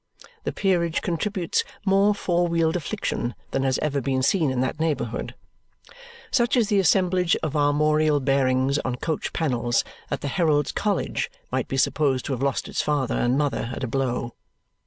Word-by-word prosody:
The - - 0
peerage 175 -4 0
contributes 180 0 -1 0.2
more 200 +1 +4
four 175 -3 +1
wheeled 165 -1 +1
affliction 175 - -3 0.2
than - - 0
has 135 -1 +1
ever 145 -2 0
been 130 0 0
seen 155 +1 +2
in 130 -1 -1
that 130 +4 -2
neighbourhood. 160 -2 -2 1.0
Such 245 0 +2
is 225 -4 +2
the 205 -2 +3
assemblage 180 -1 +3
of 155 -1 -2
armorial 150 +1 +3
bearings 135 0 +2
on 130 -3 -2
coach 155 +5 -3
panels 120 -6 0 0.3
that - - -3
the - - -3
Herald's 150 -2 +1
College 205 -1 -1 0.2
might - - -1
be 135 - -3
supposed 135 -1 +1
to 140 - -2
have 125 - -4
lost 140 -1 0
its - - -1
father 145 -4 0
and 120 +2 +1
mother 145 -5 -1
at - - -6
a - - -1
blow. 125 -1 -2
150 Hz, 170 wpm, -24 LUFS, 135-175 Hz, 1.0 s, more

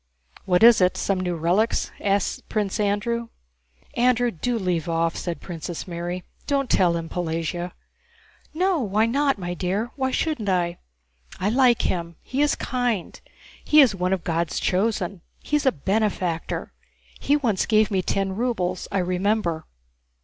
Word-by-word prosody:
"What 180 +1 +3
is 230 -3 +8
it? 180 0 +3
Some 195 -2 0
new 180 -1 -1
relics?" 180 +8 +1
asked 200 -1 -1
Prince 210 0 -1
Andrew. 215 +3 0 0.7
"Andrew, 245 0 +2
do 235 +7 -2
leave 180 -4 -1
off," 165 0 0
said 175 -2 -4
Princess 170 0 -6
Mary. 175 +1 -4 0.2
"Don't 275 -2 0
tell 175 -3 +3
him, 165 -1 -5
Pelagéya." 175 +1 -3 0.8
"No... 360 +2 +1
why 215 -2 +2
not, 275 +3 +1
my 175 -2 -4
dear, 195 +7 -2
why 265 -2 0
shouldn't 260 -6 -1
I? 175 -2 0 0.6
I 195 - +1
like 245 -1 +4
him. 170 -2 -2
He 265 +3 -2
is 295 - +3
kind, 245 -6 -2 0.4
he 305 - +5
is 260 -7 +7
one 180 -1 -1
of 190 -3 0
God's 165 -1 -1
chosen, 195 -2 0 0.2
he's 295 -2 -1
a - - +6
benefactor, 190 - -1 0.5
he 285 - +2
once 230 -10 0
gave 215 -1 +3
me 190 -2 +2
ten 195 +1 -1
rubles, 190 -6 -1
I 200 - 0
remember. 180 -2 0
195 Hz, 150 wpm, -24 LUFS, 175-235 Hz, 0.8 s, is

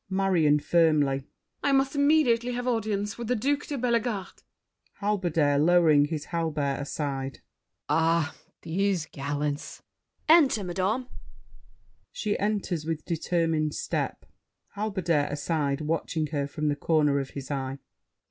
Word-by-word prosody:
MARION 185 -6 +3
(firmly). 150 -4 +2 0.4
I 280 - +1
must 270 +1 +2
immediately 285 -5 +3
have 245 +1 -3
audience 210 -3 -1
With 235 - -4
the 250 - +1
Duke 285 +6 0
de 285 - -3
Bellegarde. 235 -4 -1 0.5
HALBERDIER 170 -8 +1
(lowering 160 -2 +5
his 150 0 -4
halberd, 150 -4 -1
aside). 140 -2 -4 0.5
Ah, 165 -1 +2 0.3
these 180 0 0
gallants! 145 +1 -4 0.4
MUSKETEER. 320 +2 +9
Enter, 225 -7 -1
madame. 190 +8 -1 1.0
[She 215 - -2
enters 200 -5 -1
with 160 -1 -3
determined 165 -2 0
step. - - -3 0.5
HALBERDIER 185 -8 0
(aside, 145 -1 -1
watching 160 0 -1
her 140 -1 0
from 150 +1 -2
the 145 - +1
corner 150 -1 +2
of 135 -1 -4
his 140 0 -6
eye). 135 -1 -3
165 Hz, 125 wpm, -27 LUFS, 145-210 Hz, 1.0 s, MUSKETEER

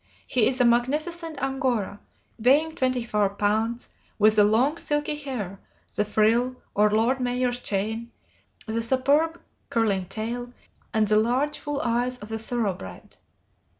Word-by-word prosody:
He 245 -4 +2
is 255 0 -1
a 250 - +5
magnificent 305 +7 0
Angora, 255 -7 -1 0.4
weighing 290 +7 +3
twenty 255 -4 0
four 210 -3 +1
pounds, 220 +4 0 0.3
with 215 0 +5
the 210 - +6
long, 250 +10 +2
silky 295 0 0
hair, 245 -10 -5 0.4
the 210 - +2
frill, 225 +4 +2 0.2
or 210 +1 +4
lord 225 +5 +2
mayor's 245 0 0
chain, 220 +2 -2 0.5
the 225 +1 -2
superb 280 +7 +2 0.3
curling 200 -5 +1
tail, 230 +5 -4 0.4
and 220 -2 +2
the 210 +1 +3
large, 255 +7 +1
full 290 -1 -3
eyes 245 +2 0
of 210 -2 -11
the 225 0 -3
thoroughbred. 200 - -4
240 Hz, 140 wpm, -25 LUFS, 215-265 Hz, 0.5 s, the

